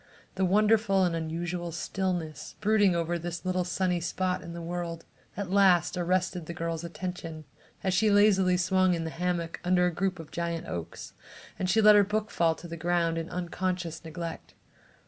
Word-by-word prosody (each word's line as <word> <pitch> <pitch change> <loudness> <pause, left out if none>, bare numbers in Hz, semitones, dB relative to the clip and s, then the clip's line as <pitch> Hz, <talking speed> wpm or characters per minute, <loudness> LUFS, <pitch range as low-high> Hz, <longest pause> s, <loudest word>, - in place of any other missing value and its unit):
The 190 0 0
wonderful 210 0 +3
and 175 -2 +1
unusual 170 +2 -3
stillness 175 -2 -3
brooding 210 -3 +3
over 170 0 -1
this 175 +1 -5
little 185 0 +1
sunny 180 0 0
spot 180 +2 -1
in 170 - -8
the 170 - -6
world, 170 -1 -4 0.3
at 200 -3 -4
last 185 -3 +4
arrested 180 -1 -1
the 170 - -6
girl's 165 -1 -3
attention 170 -2 -6 0.4
as 190 -1 +1
she 210 +4 +3
lazily 195 -3 +4
swung 185 0 +3
in 165 - -3
the 160 - -4
hammock 170 -1 -2
under 180 0 +3
a 180 - 0
group 190 +2 -1
of 165 -2 -10
giant 170 0 -3
oaks, 85 -2 -6 0.5
and 185 - -1
she 220 +5 +4
let 210 0 +8
her 205 -1 +7
book 215 +2 -2
fall 165 -1 +2
to 175 - -10
the 170 - -6
ground 170 0 +1
in 165 - -5
unconscious 175 -2 -3
neglect. 165 +1 -7
175 Hz, 180 wpm, -28 LUFS, 170-190 Hz, 0.5 s, let